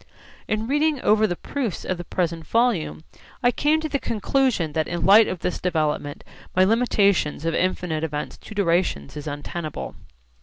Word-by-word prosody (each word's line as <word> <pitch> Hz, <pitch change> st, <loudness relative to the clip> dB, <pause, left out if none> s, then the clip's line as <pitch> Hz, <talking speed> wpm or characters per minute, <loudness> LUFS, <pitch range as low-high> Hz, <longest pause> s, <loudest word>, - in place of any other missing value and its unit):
In 215 Hz, +1 st, -1 dB
reading 295 Hz, +3 st, +1 dB
over 215 Hz, +1 st, +4 dB
the 175 Hz, -, -2 dB
proofs 245 Hz, 0 st, -4 dB
of 185 Hz, -2 st, -2 dB
the -, -, -4 dB
present 170 Hz, -2 st, -2 dB
volume, 195 Hz, -, +1 dB, 0.4 s
I 245 Hz, -, +5 dB
come 300 Hz, +5 st, +2 dB
to 315 Hz, -, -2 dB
the 280 Hz, -2 st, -1 dB
conclusion 225 Hz, -, 0 dB
that 155 Hz, 0 st, 0 dB
in 175 Hz, 0 st, -3 dB
the -, -, 0 dB
light 210 Hz, +3 st, +7 dB
of 180 Hz, -, -4 dB
this 180 Hz, -, -2 dB
development 155 Hz, -4 st, -1 dB, 0.3 s
my 185 Hz, -, +5 dB
limitation 200 Hz, -6 st, +2 dB
of 165 Hz, +1 st, -3 dB
infinite 180 Hz, -3 st, -1 dB
events 150 Hz, -2 st, -4 dB
to 215 Hz, -, -11 dB
durations 170 Hz, -, 0 dB
is 150 Hz, 0 st, -7 dB
untenable. 150 Hz, +2 st, -5 dB
185 Hz, 175 wpm, -23 LUFS, 160-225 Hz, 0.4 s, light